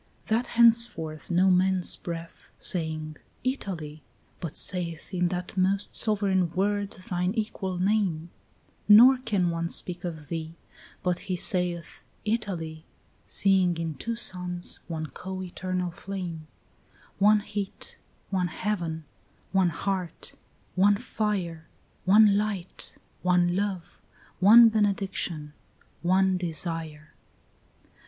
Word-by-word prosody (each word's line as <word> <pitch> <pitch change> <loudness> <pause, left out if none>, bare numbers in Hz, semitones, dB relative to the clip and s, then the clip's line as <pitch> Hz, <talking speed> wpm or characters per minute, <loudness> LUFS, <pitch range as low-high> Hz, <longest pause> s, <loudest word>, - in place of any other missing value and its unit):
9 - - +5
That 245 - -6
henceforth 230 -10 +3
no 185 +2 +4
man's 185 0 +3
breath, 165 -1 -8
Saying 155 -3 0 0.3
"Italy," 170 - -4 0.4
but 170 -2 -6
saith 175 -1 0
In 180 -1 +1
that 180 +1 -4
most 190 +2 +1
sovereign 195 -5 +3
word 205 +1 0
thine 185 -1 -3
equal 195 -4 -3
name; 180 -4 0 0.6
Nor 245 +5 +8
can 195 -8 0
one 165 0 -2
speak 175 0 -1
of 160 -5 -6
thee 165 0 -5 0.5
But 180 -2 0
he 185 - +1
saith 180 -2 -2 0.2
"Italy," 180 -8 -3 0.4
Seeing 190 -3 +2
in 165 -1 -3
two 230 - -4
suns 180 -5 -1
one 160 -2 -4
co 185 +6 -7
eternal 185 0 -3
flame; 175 -3 -6 0.7
One 210 +1 +5
heat, 205 -1 -6 0.3
one 185 -2 +1
heaven, 170 -3 -3 0.5
one 190 -2 +3
heart, 180 +1 -4 0.4
one 200 +2 +4
fire, 195 -8 -3 0.4
One 205 +1 +6
light, 200 -4 -5 0.3
one 180 -1 +2
love, 195 -3 -3 0.4
one 230 +5 +9
benediction, 195 -8 -1 0.5
one 185 +1 +3
desire. 165 -3 -5
185 Hz, 110 wpm, -27 LUFS, 170-200 Hz, 0.7 s, one